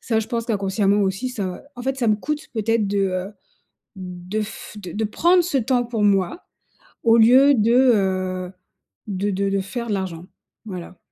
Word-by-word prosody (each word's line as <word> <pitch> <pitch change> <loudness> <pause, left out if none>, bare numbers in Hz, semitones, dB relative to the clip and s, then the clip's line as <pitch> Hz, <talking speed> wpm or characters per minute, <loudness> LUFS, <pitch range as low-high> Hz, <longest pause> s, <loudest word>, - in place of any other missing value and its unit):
ça, 225 -2 0
je 220 - -3
pense 230 -1 -2
qu'inconsciemment 200 -1 +1
aussi 195 +6 -1
ça 200 -8 -5
en 245 - -7
fait, 265 +1 -2
ça 240 -3 +1
me 210 - +3
coûte 300 +7 -4
peut-être 225 -1 +1
de, 200 0 0
heu, 190 +1 -1 0.6
de 180 +2 -5
f 215 0 -8
de 185 -4 -8
de 220 - -2
prendre 345 - +3
ce 325 -5 0
temps 245 +1 +1
pour 230 -2 -3
moi 200 - +1 0.6
au 230 -1 +5
lieu 255 +5 +7
de, 230 -1 +2
heu, 190 -7 +2 0.6
de 200 0 -2
de 195 0 -1
de 195 0 +1
faire 235 +5 -5
de - - -1
l'argent. 180 -3 -4 0.4
Voilà. 180 -3 -8
210 Hz, 185 wpm, -22 LUFS, 190-235 Hz, 0.6 s, lieu